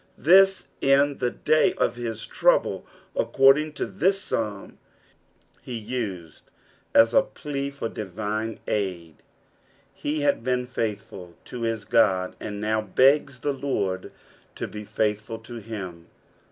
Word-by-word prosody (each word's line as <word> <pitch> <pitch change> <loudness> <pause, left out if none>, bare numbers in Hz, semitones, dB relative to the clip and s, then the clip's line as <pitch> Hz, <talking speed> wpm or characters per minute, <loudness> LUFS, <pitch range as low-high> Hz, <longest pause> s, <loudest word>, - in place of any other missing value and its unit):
This 195 +4 +5
in 140 +1 +3
thedsy 140 +5 +2
of - - +1
his 115 -2 -4
tmuble, - - +2 0.3
according 150 - +4
to - - -2
this 190 +4 +1
Psalm, 105 - -4 0.8
he 120 -2 -6
uoed 105 -8 -5 0.5
as 115 +1 +6
a - - +7
plea 140 0 -5
for 140 -4 -4
divine 110 +2 -4
aid. 90 -6 -2 0.8
He 150 +1 -3
had 140 -5 +1
been 125 0 0
faith 110 -4 -3
ful 90 -6 -11
to 125 - -7
his 115 -3 -2
God, 95 -5 +2
and 105 -1 -5
now 110 +1 0
begs 130 +5 +3
the 145 - 0
Lord 100 -9 -2 0.4
to - - -4
be 105 0 -8
faithful 105 +2 -1
to 115 +2 -10
him. 95 -7 -7
115 Hz, 130 wpm, -25 LUFS, 105-140 Hz, 0.8 s, a